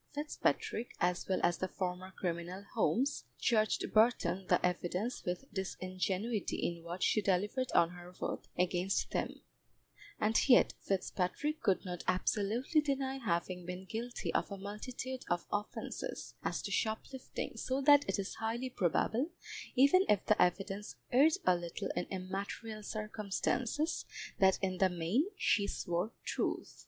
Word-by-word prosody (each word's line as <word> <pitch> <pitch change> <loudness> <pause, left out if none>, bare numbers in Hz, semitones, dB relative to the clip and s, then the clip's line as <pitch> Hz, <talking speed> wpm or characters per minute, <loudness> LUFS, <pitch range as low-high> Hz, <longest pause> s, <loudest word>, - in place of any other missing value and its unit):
Fitzpatrick, 290 -5 -1
as 180 0 +1
well 190 - +2
as 175 0 +3
the 185 - 0
former 185 0 -3
criminal 175 +2 -3
Holmes, 250 +5 +1
charged 215 -2 +1
Burton 195 -5 +3
the - - +4
evidence 180 +6 -1
with 180 +8 -3
disingenuity 190 +3 -2
in 170 -1 -2
what 175 +2 -4
she 215 - +3
delivered 205 +7 +1
on 170 0 +5
her 175 0 -10
oath - - -3
against 180 +1 +1
them, - - -2 0.8
and 220 +5 +2
yet 245 - +7
Fitzpatrick 195 - -1
could 200 -2 +2
not 180 -1 -4
absolutely 215 - +2
deny 270 -2 -1
having 180 -4 -1
been 180 +2 -6
guilty 235 +4 -4
of - - +1
a 200 - -4
multitude 250 +6 -5
of 175 0 0
offences 205 +1 -4
as - - -1
to - - -4
shoplifting, 235 +3 -2
so 260 +4 -1
that 285 +1 +7
it - - +1
is 195 -1 -3
highly 235 +3 -1
probable, 220 - +1 0.5
even 280 +9 +6
if 205 -2 +3
the 215 - +3
evidence 195 +3 0 0.2
erred 285 +6 +6
a 185 - +6
little 175 +3 -4
in - - 0
immaterial 200 +4 -5
circumstances, 215 - -1 0.3
that 190 -1 +5
in 185 -1 0
the 190 - +5
main 180 - +1
she 200 -2 +3
swore 175 +4 -1
truth. - - -2
200 Hz, 145 wpm, -34 LUFS, 180-240 Hz, 0.8 s, yet